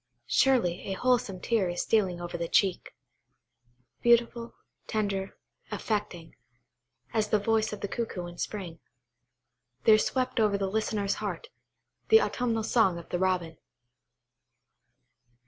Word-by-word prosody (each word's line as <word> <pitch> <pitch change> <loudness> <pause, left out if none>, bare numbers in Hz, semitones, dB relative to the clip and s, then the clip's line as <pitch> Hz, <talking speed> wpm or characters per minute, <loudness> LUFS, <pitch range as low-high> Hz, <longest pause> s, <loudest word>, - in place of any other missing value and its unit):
Surely, 235 -10 +2
a - - 0
wholesome 225 -4 +1
tear 210 -3 +1
is 175 - -2
stealing 190 -6 +1
over 175 0 -6
the 170 -1 -2
cheek. 190 +1 +1 1.1
Beautiful, 235 0 +2 0.3
tender, 200 -3 -2 0.3
affecting, 205 -7 -4 0.8
as 215 -2 +1
the 215 - +4
voice 220 +1 +1
of 210 - -7
the 200 - -2
cuckoo 200 -5 -4
in 175 0 -10
spring, 180 -6 -5 1.0
there 215 -1 +6
swept 255 +1 -1
over 210 -2 +3
the 200 - -1
listener's 210 -2 0
heart, 460 - -4 0.6
the 445 - +8
autumnal 235 - -1
song 215 -6 +2
of 170 - -10
the 175 - -2
Robin. 180 -4 -1
210 Hz, 125 wpm, -28 LUFS, 180-225 Hz, 1.1 s, the